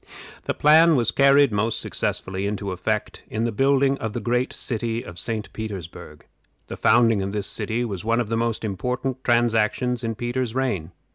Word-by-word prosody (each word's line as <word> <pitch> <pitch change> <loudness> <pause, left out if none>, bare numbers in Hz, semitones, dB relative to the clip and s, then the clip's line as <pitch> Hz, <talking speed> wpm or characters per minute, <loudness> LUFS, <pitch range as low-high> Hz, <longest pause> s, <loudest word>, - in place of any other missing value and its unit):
This - - -1
plan 160 +2 +6
was 115 -3 +2
carried 140 -1 +5
most 105 +2 0
successfully 95 +1 -3
into 100 -1 -3
effect 105 +4 -3
in 110 +1 -2
the 115 - 0
building 135 +3 +2
of 110 -2 -4
the 120 - -2
great 125 +3 0
city 115 -1 -2
of 85 -1 -9
St. 110 +5 -4
Petersburg. 100 -6 -8 0.4
The - - -7
founding 115 -3 +4
of 100 +1 -3
this 105 -2 -2
city 115 +4 -2
was 100 -6 -5
one 115 +2 +1
of 120 -3 -2
the 115 - 0
most 115 -1 -1
important 125 +6 -3
transactions 120 0 +1
in 115 -1 -2
Peter's 120 0 -3
reign. 100 -11 -1
115 Hz, 180 wpm, -23 LUFS, 105-125 Hz, 0.4 s, plan